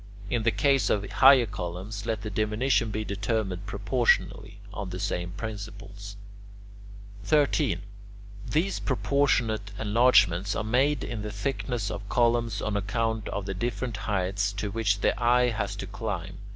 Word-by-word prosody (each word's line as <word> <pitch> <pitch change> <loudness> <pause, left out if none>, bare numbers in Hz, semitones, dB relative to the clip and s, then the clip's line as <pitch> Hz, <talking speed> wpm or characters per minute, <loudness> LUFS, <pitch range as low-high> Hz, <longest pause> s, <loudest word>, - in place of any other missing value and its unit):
In 120 - +1
the 115 - +3
case 130 +1 +2
of 100 -1 0
higher 135 +1 +6
columns, 95 +1 -6
let 110 -2 -2
the 105 - -4
diminution 110 +3 +1
be 110 +1 -3
determined 100 -2 -2
proportionally, 105 -1 0
on 100 -3 -5
the 90 0 -5
same 90 -3 -2
principles. 100 -1 -7 1.1
13. 150 -4 +2 0.7
These 175 +6 0
proportionate 125 -6 +1
enlargements 105 -4 +3
are - - -1
made 130 +7 +2
in 115 -3 -4
the 105 - -4
thickness 115 +1 -3
of 100 0 -7
columns 115 -3 +1
on 110 - -1
account 110 +2 -1
of 100 -1 -3
the 95 - -3
different 115 +2 -3
heights 100 0 -1
to 100 0 -3
which 105 -2 0
the - - +3
eye 125 +1 +4
has 110 -3 -2
to - - -5
climb. - - -5
105 Hz, 145 wpm, -27 LUFS, 100-120 Hz, 1.1 s, higher